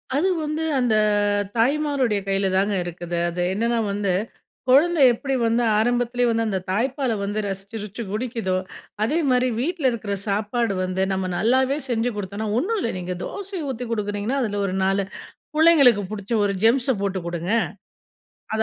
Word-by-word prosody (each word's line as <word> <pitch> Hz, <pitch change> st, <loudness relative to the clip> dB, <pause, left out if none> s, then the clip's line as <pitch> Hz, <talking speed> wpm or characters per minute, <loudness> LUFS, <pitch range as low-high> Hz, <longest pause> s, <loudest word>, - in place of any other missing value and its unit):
அது 335 Hz, +7 st, +2 dB
வந்து 305 Hz, +1 st, -2 dB, 0.2 s
அந்த 245 Hz, -3 st, +2 dB, 0.6 s
தாய்மாருடைய 265 Hz, -3 st, +2 dB
கையிலதாங்க 195 Hz, +1 st, +1 dB
இருக்குது. 175 Hz, 0 st, -5 dB
அது 175 Hz, +1 st, -3 dB
என்னன்னா 230 Hz, +3 st, 0 dB
வந்து, 200 Hz, -2 st, 0 dB, 0.6 s
குழந்தை 305 Hz, +4 st, +5 dB
எப்டி 270 Hz, +3 st, -2 dB
வந்து 230 Hz, +1 st, +2 dB
ஆரம்பத்திலேயே 245 Hz, +2 st, +1 dB
வந்து 230 Hz, 0 st, +1 dB
அந்த 195 Hz, -3 st, -1 dB
தாய்ப்பால 260 Hz, +5 st, 0 dB
வந்து 205 Hz, +2 st, -2 dB
ரசிச்சுருச்சு 200 Hz, +3 st, -6 dB
குடிக்குதோ, 220 Hz, -4 st, -2 dB, 0.5 s
அதே 290 Hz, +9 st, +1 dB
மாரி 250 Hz, 0 st, +3 dB
வீட்ல 320 Hz, +3 st, -2 dB
இருக்கற 215 Hz, -3 st, -3 dB
சாப்பாடு 210 Hz, +2 st, 0 dB
வந்து 185 Hz, +1 st, -2 dB
நம்ம 190 Hz, 0 st, -1 dB
நல்லாவே 260 Hz, +6 st, +2 dB
செஞ்சு 235 Hz, 0 st, +1 dB
குடுத்தோன்னா 205 Hz, +2 st, -4 dB
ஒன்ணுல்ல, 380 Hz, -, 0 dB
நீங்க 180 Hz, 0 st, -4 dB
தோசைய 380 Hz, -6 st, -5 dB
ஊத்தி 250 Hz, -1 st, -4 dB
குடுக்கறீங்கன்னா, 210 Hz, +4 st, -1 dB
அதுல 205 Hz, -3 st, -2 dB
ஒரு 185 Hz, -1 st, -2 dB
4 195 Hz, +1 st, +2 dB, 0.5 s
புள்ளைங்களுக்கு 300 Hz, -9 st, +6 dB
புடிச்ச 205 Hz, +1 st, -6 dB
ஒரு 200 Hz, -, +1 dB
ஜெம்ஸ 245 Hz, +3 st, +4 dB
போட்டு 195 Hz, -1 st, -1 dB
குடுங்க. 170 Hz, +1 st, -3 dB, 1.0 s
அது 220 Hz, -, +1 dB
225 Hz, 140 wpm, -23 LUFS, 200-260 Hz, 1.0 s, புள்ளைங்களுக்கு